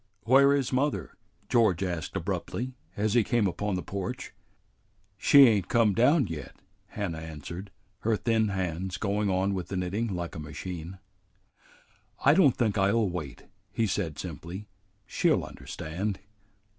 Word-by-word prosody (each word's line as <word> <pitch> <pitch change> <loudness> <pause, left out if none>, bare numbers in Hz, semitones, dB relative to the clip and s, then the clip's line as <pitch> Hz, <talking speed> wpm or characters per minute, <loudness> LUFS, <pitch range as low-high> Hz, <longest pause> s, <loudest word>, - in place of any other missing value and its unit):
"Where 135 +4 +6
is 140 -3 +1
mother?" 130 - 0 0.3
George 110 -7 +3
asked 85 -5 -3
abruptly, 130 +2 -3 0.2
as 105 +1 +1
he 120 - +5
came 115 0 +1
upon 100 +1 -1
the 90 - -3
porch. 100 -1 -5 0.8
"She 140 +7 +7
ain't 105 -7 +3
come 115 -4 +3
down 130 - +4
yet," 80 -5 -7 0.3
Hannah 95 -6 -4
answered, 80 +4 -7 0.3
her 110 +2 +1
thin 110 -1 +1
hands 90 -2 -2
going 100 +2 0
on 95 +1 +1
with 90 -3 -3
the 95 - -4
knitting 95 +6 -1
like 85 -1 -4
a - - -6
machine. 85 +4 -7 1.3
"I 140 - +7
don't 155 -7 +5
think 110 -4 +1
I'll 100 +2 +3
wait," 80 -7 -6 0.3
he 115 - +1
said 90 -6 -2
simply. 85 +5 -7 0.4
"She'll - - +2
understand." 95 +6 -5
100 Hz, 145 wpm, -28 LUFS, 90-115 Hz, 1.3 s, She